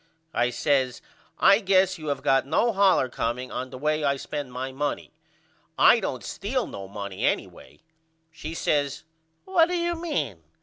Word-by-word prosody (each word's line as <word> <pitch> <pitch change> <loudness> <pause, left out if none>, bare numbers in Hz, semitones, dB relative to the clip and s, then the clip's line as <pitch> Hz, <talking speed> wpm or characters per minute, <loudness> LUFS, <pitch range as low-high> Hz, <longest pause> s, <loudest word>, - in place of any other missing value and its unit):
I 120 0 +2
says 130 0 0 0.4
I 195 +1 +6
guess 190 -3 +2
you 155 - -7
have 145 -2 -2
got 135 0 +3
no 235 +10 +2
hollor 195 -8 +4
comeing 125 +1 -3
on 130 - -4
the 130 - -9
way 155 +2 0
I 140 -1 +2
spend 140 -1 -5
my 130 +1 -4
money. 145 +2 -3 0.7
I - - +7
don't - - -4
steal - - -2
no 95 -1 -8
money 100 -1 -6
anyway. - - -2 0.5
She 160 0 -7
says 145 -3 0 0.4
What 355 -4 +4
do 360 0 -1
you 345 0 0
mean? 300 - -3
145 Hz, 165 wpm, -26 LUFS, 130-195 Hz, 0.7 s, I